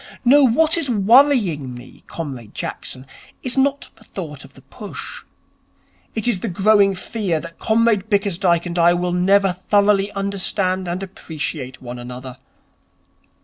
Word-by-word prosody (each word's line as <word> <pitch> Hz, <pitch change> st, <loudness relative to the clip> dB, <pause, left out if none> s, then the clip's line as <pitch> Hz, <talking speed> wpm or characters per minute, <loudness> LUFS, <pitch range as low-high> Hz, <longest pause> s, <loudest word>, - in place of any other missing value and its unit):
No, 280 Hz, +4 st, +6 dB
what 310 Hz, +7 st, +3 dB
is 285 Hz, -5 st, -2 dB
worrying 210 Hz, -, +3 dB
me, 120 Hz, -, -13 dB
Comrade 130 Hz, -9 st, -7 dB
Jackson, 130 Hz, +1 st, -5 dB, 0.4 s
is 255 Hz, -, -2 dB
not 275 Hz, +1 st, 0 dB
the -, -, -18 dB
thought -, -, -8 dB
of -, -, -16 dB
the -, -, -15 dB
push. -, -, -9 dB, 0.9 s
It 220 Hz, 0 st, -2 dB
is 225 Hz, -6 st, +1 dB
the 230 Hz, -, -4 dB
growing 195 Hz, +1 st, +3 dB
fear 185 Hz, -4 st, -2 dB
that 165 Hz, +1 st, -10 dB
Comrade 220 Hz, -2 st, +2 dB
Bickersdyke 190 Hz, -4 st, +1 dB
and 175 Hz, 0 st, -3 dB
I 170 Hz, +1 st, +5 dB
will 175 Hz, 0 st, -1 dB
never 195 Hz, +1 st, +3 dB
thoroughly 200 Hz, +2 st, +2 dB
understand 195 Hz, -1 st, -1 dB
and 175 Hz, +3 st, -3 dB
appreciate 150 Hz, -8 st, -6 dB
one 120 Hz, 0 st, -7 dB
another. 125 Hz, +1 st, -8 dB
190 Hz, 145 wpm, -20 LUFS, 170-220 Hz, 0.9 s, No